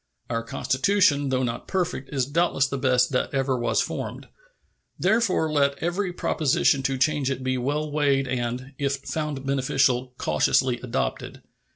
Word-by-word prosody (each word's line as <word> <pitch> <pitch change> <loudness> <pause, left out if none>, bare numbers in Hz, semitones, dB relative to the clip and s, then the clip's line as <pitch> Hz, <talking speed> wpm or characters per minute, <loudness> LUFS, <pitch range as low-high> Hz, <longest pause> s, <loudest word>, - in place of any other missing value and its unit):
Our 115 0 0
Constitution, 145 - +1
though 130 0 +1
not 115 -2 -3
perfect, 180 -7 -2
is 135 -3 0
doubtless 145 -1 +1
the 140 0 -3
best 130 -1 +2
that 125 - 0
ever 135 -1 +1
was 120 -1 +1
formed. - - -5 0.7
Therefore 190 -5 +2
let 140 -2 +2
every 180 +4 -1
proposition 150 -5 +1
to 135 0 -1
change 145 0 +1
it 130 -1 -3
be 130 0 0
well 145 +4 -2
weighed 140 -2 +2
and, 125 +2 -3
if 140 -1 0
found 140 0 -4
beneficial, 130 -2 +1
cautiously 120 - +1
adopted. 125 -2 -3
135 Hz, 150 wpm, -25 LUFS, 130-150 Hz, 0.7 s, best